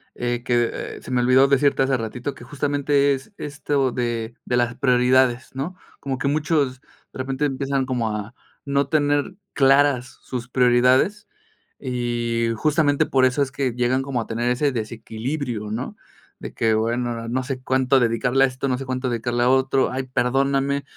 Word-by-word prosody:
eh, 120 0 -2
que, 120 -1 +2
eh, - - -6
se - - -9
me 125 - +2
olvidó 130 +2 +5
decirte 140 0 +3
hace 130 0 +1
ratito, 120 +4 -4
que 120 - -13
justamente 145 +1 +1
es, 135 +10 -7
esto 145 -2 -1
de 120 -1 -3
de 125 - 0
las 120 0 0
prioridades, 125 -1 +2
¿no? 150 +8 -4 0.2
Como 135 -1 -3
que 125 - -2
muchos 145 -3 0
de - - -18
repente 135 +2 -1
empiezan 135 -1 -1
como 120 -4 -1
a 105 +3 -6 0.3
no 140 0 +1
tener 145 +4 +1 0.2
claras 135 -2 +3
sus 125 -1 -6
prioridades 125 +11 +3 0.5
y 120 -2 -1
justamente 145 +3 +2
por 130 -1 +3
eso 130 +3 +1
es 135 -2 0
que 130 -2 -1
llegan 125 +2 +1
como 135 -2 -2
a - - -7
tener 120 +2 -1
ese 140 +4 +1
desequilibrio, 115 +1 -4
¿no?, 115 +4 -4 0.4
de - - -7
que: 110 -1 +1
"Bueno, 120 +2 0
ahora, 115 -1 -5
no 130 +2 -1
sé 130 0 -5
cuánto 130 +1 +2
dedicarle 125 +3 +2
a - - +2
esto, 130 +1 -4
no 125 - 0
sé 135 - -6
cuánto 130 0 -2
dedicarle 120 0 -1
a 125 - +3
otro, 130 0 +2
ay 130 +1 -2
perdóname, 135 +2 0
130 Hz, 175 wpm, -22 LUFS, 120-140 Hz, 0.5 s, olvidó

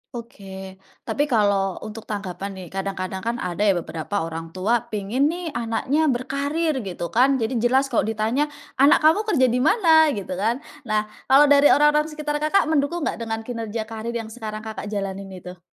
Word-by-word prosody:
Oke. 190 -5 -9 0.2
Tapi 290 +1 -1
kalau 200 -6 +2
untuk 220 +1 -8
tanggapan 200 -1 -5
nih, 185 -2 -9
kadang-kadang 190 -1 -4
kan 235 - 0
ada 175 -2 -4
ya 195 - +4
beberapa 170 +2 -3
orang 165 +1 -7
tua 225 +6 +2
pengen 220 +6 0
nih 340 0 -3
anaknya 245 +6 0
berkarir 280 +4 -1
gitu 180 -5 -5
kan. 265 +4 +4
Jadi 235 0 -1
jelas 260 +4 +2
kalau 230 - +1
di 225 - -2
tanya, 230 +8 0 0.3
"Anak 290 +3 +5
kamu 400 +8 +4
kerja 265 -11 +3
di 250 - +1
mana?" 320 - +5
Gitu 200 -2 -6
kan. 225 +9 -1 0.2
Nah, 215 0 +1 0.2
kalau 275 +2 +7
dari 285 0 +7
orang-orang 295 +1 +4
sekitar 300 -1 -3
Kakak, 310 +2 +2
mendukung 310 +2 0
nggak - - -2
dengan 225 -1 -4
kinerja 230 -2 -4
karir 225 +1 -6
yang 225 -1 -4
sekarang 215 -2 -6
Kakak 220 -2 -6
jalanin 195 -1 -4
itu? 180 -1 -10
230 Hz, 180 wpm, -23 LUFS, 200-285 Hz, 0.3 s, kalau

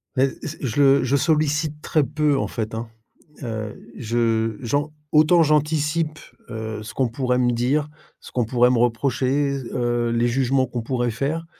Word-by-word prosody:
Mais, 135 +1 +3
s 155 +1 -6
je 135 +2 0
le 140 0 +5
je 130 +2 +1
sollicite 150 0 +1
très 155 - +1
peu 150 0 +1
en - - -1
fait, 110 -1 -4
hein. 115 +1 -4 0.6
Heu, 110 -3 -5 0.2
je 115 -2 0
j'en 145 +5 -1 0.2
autant 155 +3 +5
j'anticipe, 155 +1 +1 0.3
heu, 110 -1 -5
ce 110 - -8
qu'on 130 -2 0
pourrait 125 +1 -1
me 125 -1 +2
dire, 135 +6 0 0.3
ce - - -13
qu'on 125 - +1
pourrait 125 +2 +3
me 125 - +2
reprocher, 135 +3 +1
heu, 120 -1 0
les 120 +1 +1
jugements 130 +1 +1
qu'on 120 -1 -4
pourrait 120 0 -1
faire, 150 +7 -2
130 Hz, 170 wpm, -22 LUFS, 120-150 Hz, 0.6 s, le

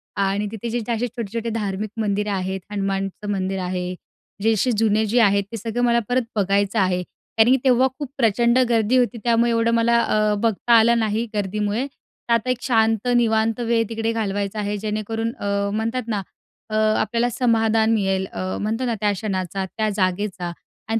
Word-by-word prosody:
आणि 200 +1 0
तिथे 225 +1 -5
जे, 240 +1 -1
त - - -7
असे 235 +1 0
छोटे-छोटे 230 -1 -4
धार्मिक 210 -1 -2
मंदिरे 210 -1 -1
आहेत 190 -1 -2
हनुमानचं 195 0 -3
मंदिर 190 -1 -2
आहे, 180 0 -3 0.5
जे 225 +2 +3
असे 220 +4 +1
जुने 220 0 +2
जे 225 +4 +2
आहेत, 200 -2 +4
ते 230 - -4
सगळं 230 +3 -2
मला 235 -1 +4
परत 250 +1 +2
बघायचं 200 +1 +1
आहे. 185 -2 +1 0.4
कारण 220 +2 +6
की 265 - +5
तेव्हा 260 0 +4
खूप 290 -3 -4
प्रचंड 235 0 +3
गर्दी 230 +1 +3
होती 245 -1 +1
त्यामुळे 235 0 +3
एवढं 230 0 +2
मला 235 0 +3
अ, 215 -2 +1
बघता 230 +1 +2
आलं 235 +1 +4
नाही 220 +1 0
गर्दीमुळे. 210 +4 -1
तर 240 -3 -6
आता 230 +2 +1
एक 250 - +1
शांत, 225 -1 +2
निवांत 225 -1 +2
वेळ 230 -1 +1
तिकडे 225 0 -1
घालवायचा 205 -1 -2
आहे 205 0 -2
जेणेकरून 215 +2 -3
अ, 200 0 -1
म्हणतात 230 +4 -1
ना 210 -3 -1 0.5
अ, 215 - -3 0.3
आपल्याला 235 +3 0
समाधान 225 -2 +2
मिळेल. 195 -3 0
अ, 185 0 -3
म्हणतो 225 +5 -1
ना 235 -2 0
त्या 210 -1 +3
क्षणाचा, 190 -2 -3
त्या 215 +3 -2
जागेचा 185 -2 -1 0.4
आणि 225 - +2
220 Hz, 180 wpm, -22 LUFS, 200-230 Hz, 0.5 s, कारण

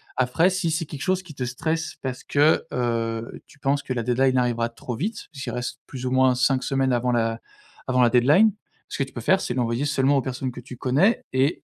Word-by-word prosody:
Après, 130 +9 +2
si 185 -2 -1
c'est 160 +1 -1
quelque 145 -2 -8
chose 185 +4 0
qui 165 - -11
te 135 - -4
stresse 160 +6 -2
parce 130 -2 -4
que, 145 +2 +3
heu, 115 -2 -2
tu - - -19
penses 140 0 0
que - - -8
la 120 -2 -1
deadline 130 +2 +2
arrivera 120 -2 +1
trop 120 +1 -6
vite, 205 - -4
puisqu'il 135 -3 -6
reste 125 +1 -4
plus 130 -1 -7
ou 125 - -1
moins 130 -1 +4
5 130 +1 +2
semaines 135 -1 +1
avant 125 +1 +1
la 115 -1 0 0.5
avant 125 -1 +3
la 120 - +5
deadline. 150 - +5 0.4
Ce - - -6
que - - +3
tu 135 - -10
peux 120 - -5
faire, 190 +11 +3
c'est 120 - -3
l'envoyer 120 +2 0
seulement 140 -1 +2
aux - - +2
personnes 130 0 -4
que 125 - -9
tu 125 0 -10
connais 145 - +2
et 135 +4 +1
130 Hz, 230 wpm, -24 LUFS, 125-145 Hz, 0.5 s, la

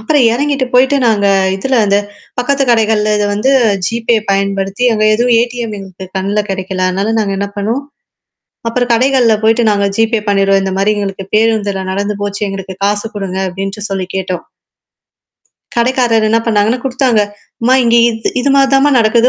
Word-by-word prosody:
அப்புறம் 260 +4 +2
இறங்கிட்டு 275 +1 0
போயிடு 265 +3 +4
நாங்க 210 -3 +2 0.3
இதுல 255 +6 0
இந்த 200 0 +3 0.4
பக்கத்து 275 +3 +1
கடைகள்ல 215 -2 +2
இத 210 - 0
வந்து 215 +6 +1 0.4
GPay 230 +1 0
பயன்படுத்தி, 195 +3 -1
அங்க 215 -1 0
எதுவும் 240 +1 +2
ATM 240 -1 -3
எங்களுக்கு 190 -1 -10
கண்ணல 200 +2 -1
கிடைக்கல 190 -1 -2
அதனால 195 +4 -1
நாங்க 200 -2 -1
என்ன 200 - -2
பண்ணுவோம்? 225 +7 -2 0.9
அப்புறம் 245 +1 -1
கடைகள்ல 250 -2 +3
போயிடு 225 +2 +3
நாங்க 200 -1 +1
GPay 225 0 +1
பண்ணிடுறோம். 195 -1 +2
இந்த 190 -1 -2
மாரி 200 +2 +2
எங்களுக்கு 195 -1 -4
பேருந்துல 215 -3 +1
நடந்து 200 +2 -2
போச்சு. 205 0 -4
எங்களுக்கு 195 -1 -6
காசு 205 +1 -1
குடுங்க 190 -2 -4
அப்டின்ட்டு 195 +3 -5
சொல்லி 190 -2 -3
கேட்டோம். 185 -2 -3 1.3
கடைக்காரர் 235 -2 +2
என்ன 225 +1 +3
பண்ணாங்கன்னா 220 +2 +1
குடுத்தாங்க." 260 -4 +1 0.4
அம்மா 245 +3 +3
இங்க 235 0 +3
இது 225 -1 -2
இது 280 - 0
மாரி 275 -1 +4
தாம்மா 275 +2 +4
நடக்குது 230 +2 +3
215 Hz, 160 wpm, -13 LUFS, 195-240 Hz, 1.3 s, போயிடு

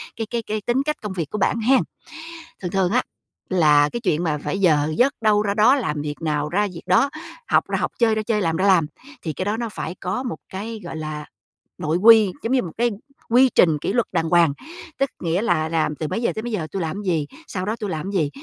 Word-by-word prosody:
cái 225 - -3
cái 235 -1 -1
cái 215 0 -1
tính 245 +5 0
cách 300 0 -1
công 210 -3 -5
việc 165 -5 -3
của 210 - -4
bạn 210 +3 +1
hen. 255 +3 +4 0.8
Thường 180 - -3
thường 190 -2 +1
á, 250 - +3 0.5
là 150 -5 +4
cái 240 - -3
chuyện 175 -6 0
mà 150 -2 0
phải 195 - -3
giờ 155 -4 +3
giấc 270 +3 +4
đâu 210 -1 +3
ra 200 -1 -1
đó, 225 +6 +5
làm 150 - -2
việc 150 +2 -6
nào 150 -1 -1
ra 205 +5 +1
việc - - -9
đó, 195 +10 +3 0.4
học - - +3
ra - - -1
học, - - -1
chơi 225 -2 +3
ra 215 - -1
chơi, 215 -1 0
làm 165 -1 0
ra 195 - +1
làm, 175 -6 +4 0.4
thì 160 - -3
cái 185 - -4
đó 210 +2 -1
nó 235 -1 -3
phải 180 -4 -5
có 195 +8 -2
một 245 - -4
cái, 215 +3 -6
gọi 165 - -6
là, 155 -1 -5 0.5
nội 155 +2 0
quy, 215 -1 +7
giống 235 +3 0
như 255 - +3
một 170 - -6
cái 240 +1 +2 0.4
quy 255 +2 +5
trình 160 -4 +5
kỷ - - -2
luật 240 -3 +1
đàng 165 0 0
hoàng, 170 -4 +4 0.5
tức 275 -2 +2
nghĩa 170 +3 0
là 160 -7 +1
làm 155 -2 0
từ 155 - -4
mấy 230 - -3
giờ - - +1
tới 220 - -3
mấy 240 - -4
giờ 165 -7 -2
tui 195 - -3
làm 170 +6 -3
gì, 160 -6 0 0.2
sau 185 -1 -4
đó 215 +2 -1
tui 210 -3 -3
làm 170 +5 -4
gì. 160 -7 +1
190 Hz, 255 wpm, -22 LUFS, 160-225 Hz, 0.8 s, quy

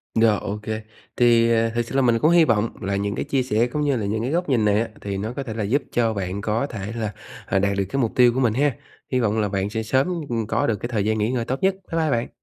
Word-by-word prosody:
Rồi, 110 -2 +4
ô 105 - -4
kê. 110 0 -3 0.4
Thì, 115 -1 +4
ờ, 115 0 +2
thực 120 +1 -1
sự 125 - -7
là 135 - +4
mình 120 -3 +3
cũng 155 +5 +4
hy 170 -2 +6
vọng 115 -3 +2
là 100 +1 -1
những 100 0 -1
cái - - -3
chia 135 -2 0
sẻ 115 0 +1
cũng 150 +5 -3
như 145 -3 +1
là 110 - -2
những 110 +2 -1
cái 125 +4 -2
góc 175 0 -1
nhìn 120 -5 +2
này 105 +1 +3
á, 115 - -2
thì 100 -1 -3
nó 110 +4 -4
có 140 - -4
thể 115 -5 -6
là 110 -1 -3
giúp 130 +8 +1
cho 115 -2 +1
bạn 100 -1 -3
có 110 +4 0
thể 105 -1 -5
là, 110 -3 -2 0.3
ờ, 95 - +1
đạt 100 0 0
được 100 - +1
cái 135 - 0
mục 115 - 0
tiêu 125 -1 +5
của 130 - -1
mình 120 -5 +2
ha. 140 +1 +1 0.4
Hy 130 - +2
vọng 110 -2 +1
là 105 -1 0
bạn 95 0 -1
sẽ 110 +1 -3
sớm, 135 +10 0
ừm, 115 -3 -2
có - - 0
được 115 - +1
cái 120 +4 -5
thời 105 -5 -1
gian 110 0 +1
nghỉ 110 +2 0
ngơi 120 -3 -1
tốt 130 +3 -2
nhất. 190 0 +3 0.2
Bye 165 - 0
bye 160 - +1
bạn! 120 -1 0
115 Hz, 315 wpm, -23 LUFS, 105-125 Hz, 0.4 s, hy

